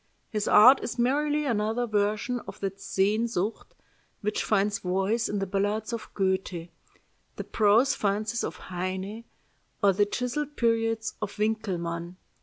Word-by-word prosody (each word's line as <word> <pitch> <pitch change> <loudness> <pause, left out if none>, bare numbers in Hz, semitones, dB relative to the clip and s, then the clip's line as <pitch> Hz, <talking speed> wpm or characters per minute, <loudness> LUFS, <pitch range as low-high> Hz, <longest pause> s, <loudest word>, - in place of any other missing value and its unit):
His 210 -2 -1
art 255 +6 +8
is - - -4
merely 295 +5 +1
another 225 -1 0
version 215 +3 0
of - - -9
that 195 0 -3
Sehnsucht 210 +1 -1 0.5
which 210 0 -1
finds 205 -1 +1
voice 195 +6 0
in 205 - -1
the 195 - -1
ballads 205 +4 -1
of 230 -2 -5
Goethe, 190 -3 -1 0.7
the - - -5
prose 225 +6 +3
fancies 215 +3 -1
of - - -3
Heine, 190 +5 -5 0.6
or 200 -1 +6
the 205 +2 +2
chiselled 270 +7 -3
periods 225 -1 +1
of 205 -1 -4
Winckelmann. 180 -5 -2
210 Hz, 135 wpm, -27 LUFS, 195-230 Hz, 0.7 s, art